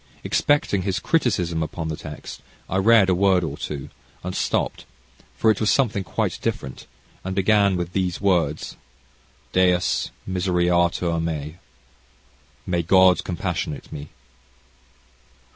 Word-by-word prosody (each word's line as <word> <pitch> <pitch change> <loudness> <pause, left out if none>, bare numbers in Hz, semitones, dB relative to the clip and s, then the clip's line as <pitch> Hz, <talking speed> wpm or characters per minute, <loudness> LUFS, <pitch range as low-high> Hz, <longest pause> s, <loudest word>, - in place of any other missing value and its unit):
Expecting 145 -9 +1
his 95 0 -1
criticism 90 - 0
upon 80 +1 -4
the 80 - -3
text, - - -9 0.3
I 95 - -1
read 105 0 +5
a 95 - +3
word 95 0 +3
or 80 - -3
two, 70 -3 -6 0.3
and 90 +1 -4
stopped, - - -1 0.5
for 110 - +4
it 105 - -1
was 105 - +2
something 110 -7 +2
quite - - -2
different, 65 0 -4 0.4
and 95 0 -4
began 100 0 +3
with 90 0 -4
these 90 -2 -1
words, 85 -7 0 0.7
Deus 90 -1 +2 0.2
misereatur 90 -2 +1
mei 80 -1 -4 1.1
"May 85 -1 0
God 95 0 +5
compassionate 80 -4 -4
me." 75 0 -7
90 Hz, 125 wpm, -23 LUFS, 85-95 Hz, 1.1 s, read